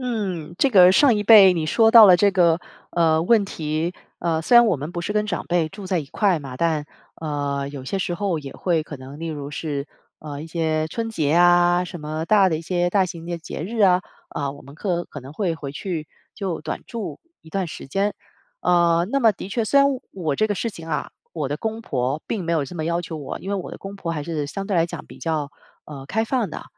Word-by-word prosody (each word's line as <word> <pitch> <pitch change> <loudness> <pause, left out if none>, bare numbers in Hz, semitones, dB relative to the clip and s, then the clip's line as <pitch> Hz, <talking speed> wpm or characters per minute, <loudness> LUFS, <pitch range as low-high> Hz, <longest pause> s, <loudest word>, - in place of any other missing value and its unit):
嗯， 195 -10 -3
这 275 - +3
个 185 -4 +7
上 255 +5 +5
一 210 - -2
辈， 200 -4 +9
你 165 -3 -2
说 225 +7 +4
到 225 -2 +10
了 180 - +8
这 200 +3 +4
个， 175 -3 +3 0.3
呃， 160 -2 +2
问 215 +2 +4
题。 160 -1 -3 0.3
呃， 165 -2 0
虽 240 +9 +5
然 240 - +8
我 210 - +3
们 145 +4 -6
不 175 -1 -4
是 190 +4 -3
跟 210 0 0
长 - - -3
辈 170 -2 +1
住 195 +2 -9
在 185 -3 0
一 145 - -8
块 185 +1 +1
嘛， 135 -3 -8
但 155 -2 0 0.3
呃， 145 -2 -2
有 140 -2 -8
些 195 +8 -2
时 175 - -2
候 190 -3 -1
也 135 -2 -8
会 170 -4 0
可 150 -2 -9
能， 135 +4 -11
例 165 - -4
如 145 -3 -5
是， 145 -1 -3 0.3
呃， 145 -1 -7
一 160 - -8
些 160 -1 -1
春 225 +6 -3
节 155 -10 -1
啊， 175 +1 +5
什 175 -2 -8
么 155 +1 -4
大 195 0 +4
的 160 - 0
一 - - -5
些， 175 +1 0
大 190 -1 +3
型 165 -1 -8
的 170 -1 -3
节 160 -1 -7
日 225 +6 -5
啊， 185 -3 +5 0.3
呃， 140 -1 -2
我 140 +1 -11
们 140 - -13
可 175 0 -2
可 145 - -9
能 135 +3 -11
会 175 -1 -1
回 145 -4 -7
去 160 0 -5 0.3
就 185 -6 -3
短 - - -5
住 230 -4 -6 0.2
一 160 - -15
段 185 +1 -2
时 150 - -8
间。 200 +8 0 0.5
呃， 170 -1 +3
那 275 - +2
么 225 - +6
的 195 -1 -7
确， 230 +3 -1
虽 280 +6 +3
然 275 - +6 0.3
我 160 -7 -2
这 215 +6 +1
个 205 - 0
事 230 - -1
情 165 -6 -9
啊， 150 -3 -2 0.2
我 155 -4 -3
的 145 - -2
公 220 +4 -4
婆 135 - -2
并 210 - -2
没 170 - -1
有 155 -4 +1
这 160 - -10
么 160 -2 -3
要 170 +1 0
求 165 -2 -6
我， 145 -3 -6
因 195 - -7
为 - - 0
我 190 -3 -4
的 - - -9
公 195 +1 -8
婆 175 -4 -5
还 150 -3 -3
是 150 -4 -3
相 195 +5 -5
对 195 -3 0
来 165 - +4
讲 170 - -7
比 - - -13
较 155 -3 -1 0.4
呃， 140 -3 -9
开 220 +6 0
放 230 -6 -1
的。 - - -7
170 Hz, 270 characters per minute, -22 LUFS, 155-195 Hz, 0.5 s, 到